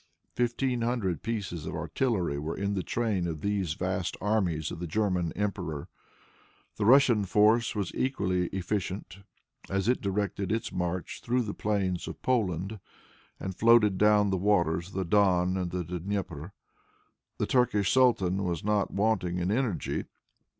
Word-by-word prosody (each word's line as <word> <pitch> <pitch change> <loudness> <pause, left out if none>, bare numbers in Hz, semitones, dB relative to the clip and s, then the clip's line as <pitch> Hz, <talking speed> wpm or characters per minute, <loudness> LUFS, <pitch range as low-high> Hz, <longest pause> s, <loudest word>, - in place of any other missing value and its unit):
Fifteen 125 +1 0
hundred 115 - -1
pieces 95 -8 -4
of 80 - -4
artillery 85 - -1
were 75 +3 -4
in 100 +1 -1
the 95 - -1
train 105 -5 -1
of 80 -3 -4
these 100 -6 -1
vast 95 0 -2
armies 90 -7 0
of - - -6
the 90 - -4
German 90 -2 0
emperor. 90 -8 -3 0.9
The 105 - 0
Russian 125 -4 +6
force 110 +5 +3
was 100 -4 -2
equally 95 -9 0
efficient, 95 +1 -4 0.5
as 95 +1 -1
it 125 - +2
directed 100 -1 -2
its 115 +1 -1
march 90 0 -3
through 125 +1 +1
the 105 -2 -4
plains 95 -4 -1
of - - -7
Poland, 100 -4 0 0.6
and 95 -1 -5
floated 110 -3 +5
down 105 0 +5
upon 105 - +1
the 95 - +1
waters 85 -4 +1
of - - -14
the 95 -1 -1
Don 90 -1 +3
and 90 -2 -2
the 90 0 -3
Dnieper. 90 -1 -4 0.9
The - - 0
Turkish 105 -7 +2
sultan 100 -8 +3
was 85 -4 -2
not 105 -1 +1
wanting 100 -4 0
in 90 +2 0
energy. 115 -5 -1
100 Hz, 155 wpm, -29 LUFS, 90-105 Hz, 0.9 s, Russian